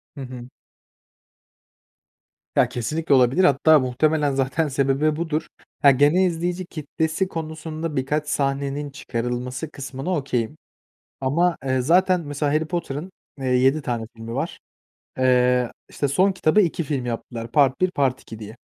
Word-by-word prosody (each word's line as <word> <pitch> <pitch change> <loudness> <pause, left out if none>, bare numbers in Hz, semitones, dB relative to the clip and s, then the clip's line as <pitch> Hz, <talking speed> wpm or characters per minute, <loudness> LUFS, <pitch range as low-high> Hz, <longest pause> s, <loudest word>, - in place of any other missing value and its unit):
Hı 140 - -7
hı. 125 -1 -8 2.1
Ya, - - +4
kesinlikle 145 +6 -1
olabilir, 130 +8 +4
hatta 155 0 +5
muhtemelen 145 +3 +1
zaten 135 +4 0
sebebi 140 +3 +1
budur. 160 -1 -2 0.3
Ha, 140 -2 +8
genel 145 +8 +4
izleyici 175 +2 -2
kitlesi 160 +3 -2
konusunda 160 -1 -5
birkaç 150 +3 -1
sahnenin 140 +1 -1
çıkarılması 125 +2 -4
kısmına 140 +5 -4
okay'im. 135 -1 -2 0.6
Ama, 165 +6 +2
eee, 130 -1 +1
zaten 180 +6 +3
mesela 145 -1 -2
Harry 155 +1 +2
Potter'ın, 170 +1 -4 0.3
eee, 135 - -4
7 130 +4 +3
tane 115 -3 -3
filmi 115 +1 -7
var. - - -3 0.6
Eee, 125 -1 +3 0.2
işte, 145 - -1
son 185 +8 +3
kitabı 185 +2 +3
2 170 -2 0
film 135 -4 -2
yaptılar. 115 -1 -5
Part 140 +1 +3
1, 185 0 +3
part 135 -5 0
2 110 -1 -10
diye. 110 +2 -9
140 Hz, 140 wpm, -23 LUFS, 130-160 Hz, 2.1 s, Ha